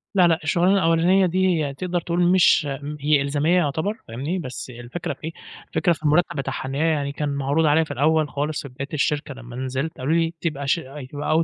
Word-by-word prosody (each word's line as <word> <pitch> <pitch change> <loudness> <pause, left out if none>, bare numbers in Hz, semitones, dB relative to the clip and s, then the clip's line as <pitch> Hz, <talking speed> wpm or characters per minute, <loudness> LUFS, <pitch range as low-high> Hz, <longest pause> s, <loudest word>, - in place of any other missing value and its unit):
لأ، 180 -2 +6
لأ، 165 0 +2
الشغلانة 180 +2 +3
الأولانية 180 +2 +4
دي 185 +2 +2 0.2
هي 140 - -4
تقدر 175 +3 -2
تقول 175 +2 -1
مش 175 -5 +5 0.3
هي 145 0 +3
إلزامية 145 +5 +1
يعتبر، 160 +5 0
فاهمني 140 +11 -3
بس 130 -3 -6
الفكرة 120 +7 -5
في - - -21
إيه، 160 - -3 0.4
الفكرة 175 - +2
في 155 - -11
المرتب 155 +1 +2
بتاعها، 135 -1 -3
إن 135 - -4
هي 160 +3 +2
يعني 140 -3 0
كان 145 0 -3
معروض 140 +3 +1
عليّ 155 +2 +4
في 145 - -9
الأول 155 +2 +2
خالص، 150 +2 -2
في 140 - -9
بداية 140 +2 -6
الشركة 150 -1 -1
لما 120 -2 -11
نزلت. 130 +4 -3
قالوا 140 +5 -1
لي: 165 0 +1
"تبقى 140 -4 -2
ش - - +4 0.4
تبقى 155 +3 +1
150 Hz, 210 wpm, -23 LUFS, 140-170 Hz, 0.4 s, لأ